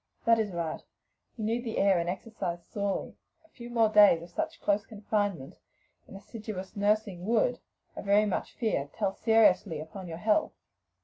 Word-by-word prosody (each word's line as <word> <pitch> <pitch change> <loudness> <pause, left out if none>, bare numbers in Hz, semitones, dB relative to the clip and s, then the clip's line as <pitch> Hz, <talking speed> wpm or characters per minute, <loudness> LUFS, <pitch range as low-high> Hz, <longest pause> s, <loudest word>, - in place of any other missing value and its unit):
"That 230 0 +5
is 210 -2 -1
right; 170 -2 -3 0.6
you 220 - -4
need 230 +2 -1
the 225 -3 -4
air 195 -3 +4
and 170 +1 -2
exercise 180 -3 -5
sorely; 200 -1 -3 0.3
a - - -25
few 240 -4 -11
more 230 -2 +3
days 205 -6 +6
of 170 - -13
such - - -3
close 205 +1 +1
confinement 205 - -3 0.5
and 195 - -10
assiduous 210 -1 -8
nursing 205 -3 0
would, 370 - +2 0.4
I - - -5
very 205 +1 +3
much 205 - -3
fear, 180 - -1
tell 195 - 0
seriously 195 -8 +3
upon 170 +4 -8
your 165 -1 -6
health." 215 - +1
205 Hz, 170 wpm, -29 LUFS, 180-220 Hz, 0.6 s, days